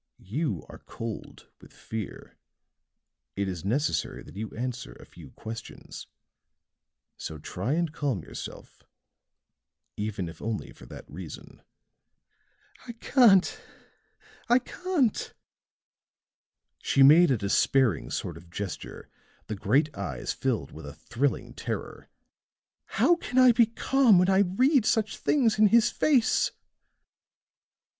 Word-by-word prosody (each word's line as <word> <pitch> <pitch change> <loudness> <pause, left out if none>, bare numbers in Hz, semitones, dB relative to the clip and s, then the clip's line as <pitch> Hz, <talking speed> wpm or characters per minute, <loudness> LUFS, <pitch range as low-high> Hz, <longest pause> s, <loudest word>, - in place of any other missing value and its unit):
You 110 - -2
are - - -12
cold 115 -2 -8
with - - -16
fear. 110 -2 -8 1.0
It 100 0 -1
is 90 -4 -5
necessary 140 +10 -1
that - - -14
you 110 +1 -5
answer 125 0 -4
a - - -15
few 80 -6 -14
questions; 110 - -9 1.1
so 80 - -6
try 95 - -3
and 165 -1 -1
calm 135 - -2
yourself - - -9 1.1
even 105 -4 -3
if 80 -1 -10
only 110 -1 -4
for - - -15
that - - -11
reason." 80 +1 -10 1.3
"I 235 - -6
can't! 225 -5 +4 0.9
I 240 - +6
can't!" 285 - -1 1.5
She 135 - +3
made 160 +6 +7
a 130 - +2
despairing 110 +4 +2
sort 85 - -4
of 85 +1 -15
gesture, 95 +2 -6 0.4
the 110 - -4
great 140 +10 +1
eyes 70 -11 -4
filled 115 - -2
with 80 -2 -10
a 70 - -9
thrilling 120 - -2
terror. - - -6 0.8
"How 345 - +3
can 255 -6 -5
I 255 -1 +8
be 235 -1 +4
calm 235 -1 +3
when 180 +2 +4
I 190 - +4
read 245 - +3
such 220 -1 0
things 235 -7 +2
in 215 - +7
his 230 +2 +4
face?" 265 -7 +2
135 Hz, 120 wpm, -27 LUFS, -, 1.5 s, I